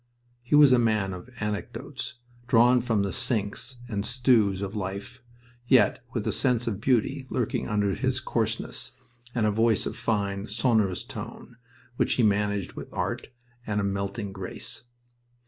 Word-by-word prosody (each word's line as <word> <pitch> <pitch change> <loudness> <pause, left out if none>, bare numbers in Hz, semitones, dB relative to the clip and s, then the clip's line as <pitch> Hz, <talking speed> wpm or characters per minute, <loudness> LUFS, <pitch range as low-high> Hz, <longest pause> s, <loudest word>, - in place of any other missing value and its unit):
He 120 +4 +1
was 145 -3 +8
a 125 - +5
man 105 -5 +1
of 90 +3 -8
many 125 -2 -16
anecdotes, 105 +2 -4 0.3
drawn 125 +1 +5
from 115 -4 +1
the 100 - -2
sinks 110 +3 -2
and 100 -4 -2
stews 115 -6 +3
of 100 +1 -4
life, 100 +5 -5 0.5
yet - - +4
with - - -2
a - - 0
sense 125 -2 +1
of 105 -3 -2
beauty 130 +2 +1
lurking 120 -4 -1
under 105 -2 +1
his 130 +2 0
coarseness, 115 -3 -2 0.4
and 115 -3 +2
a 105 - +3
voice 110 +1 +3
of - - -3
fine, 100 -2 -1
sonorous 110 -8 +1
tone, 120 - -9 0.4
which - - +2
he 125 - +2
managed 105 -2 +1
with - - -8
art - - -2 0.4
and 105 -1 0
a - - 0
melting 100 +1 -2
grace. 95 +4 -5
110 Hz, 160 wpm, -27 LUFS, 100-120 Hz, 0.5 s, was